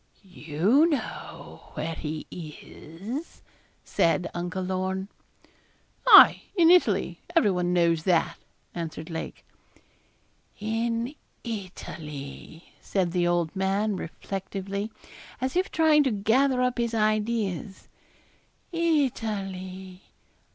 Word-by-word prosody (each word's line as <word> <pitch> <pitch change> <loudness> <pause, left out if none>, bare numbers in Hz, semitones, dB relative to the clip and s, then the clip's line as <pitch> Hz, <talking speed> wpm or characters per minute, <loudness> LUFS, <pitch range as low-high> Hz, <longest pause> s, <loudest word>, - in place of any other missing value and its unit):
'You 190 - +2
know 300 -5 -5
where 165 +1 -3
he 155 0 -5
is,' 175 - -8 0.4
said 170 +1 +1
Uncle 180 +2 -3
Lorne. 190 +1 -2 1.0
'Aye, - - +9
in 340 -3 +6
Italy; 360 -1 +3 0.2
everyone 180 - +3
knows 170 -2 +3
that,' 170 -1 +1 0.3
answered 165 -1 -6
Lake. 160 - -6 1.1
'In 230 +4 -1 0.3
Italy,' 160 - -8
said 185 -4 -1
the 175 -1 +1
old 175 0 0
man, 195 +2 0
reflectively, 195 +3 -5 0.5
as 260 +2 -2
if 370 +1 +1
trying 315 -2 +4
to 265 - +2
gather 250 +5 +2
up 250 -1 0
his 235 -1 0
ideas, 215 -3 -1 0.8
'Italy. 195 - -2
195 Hz, 95 wpm, -26 LUFS, 175-235 Hz, 1.1 s, Aye